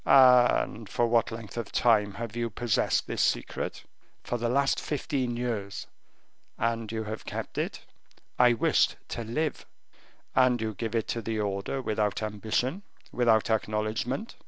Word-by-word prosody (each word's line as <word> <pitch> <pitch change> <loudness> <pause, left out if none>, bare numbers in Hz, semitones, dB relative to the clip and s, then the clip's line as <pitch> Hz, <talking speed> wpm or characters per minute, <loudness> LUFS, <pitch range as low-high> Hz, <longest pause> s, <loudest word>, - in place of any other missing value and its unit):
"And 125 -4 +5
for 120 - +1
what 115 0 +2
length 115 0 -8
of 115 -3 -4
time 105 -4 +3
have 115 -1 -5
you 120 -1 -1
possessed 115 +1 +1
this - - -2
secret?" - - -1 0.4
"For 120 - -2
the 120 0 0
last 140 +2 +2
fifteen 135 -5 -2
years." 110 -5 -3 0.7
"And 115 -1 -1
you 110 -1 -2
have 110 +1 -6
kept - - -5
it?" - - -3 0.6
"I 125 -1 +7
wished 115 - +2
to 115 - -4
live." 150 +8 -2 0.7
"And 130 -2 +4
you 110 -1 -2
give 115 +3 -4
it 115 - 0
to 115 - -1
the 110 0 -2
order 100 +6 -2
without 105 -2 0
ambition, 110 - -1 0.3
without 115 -3 +3
acknowledgement?" 110 - -1
115 Hz, 150 wpm, -28 LUFS, 110-125 Hz, 0.7 s, I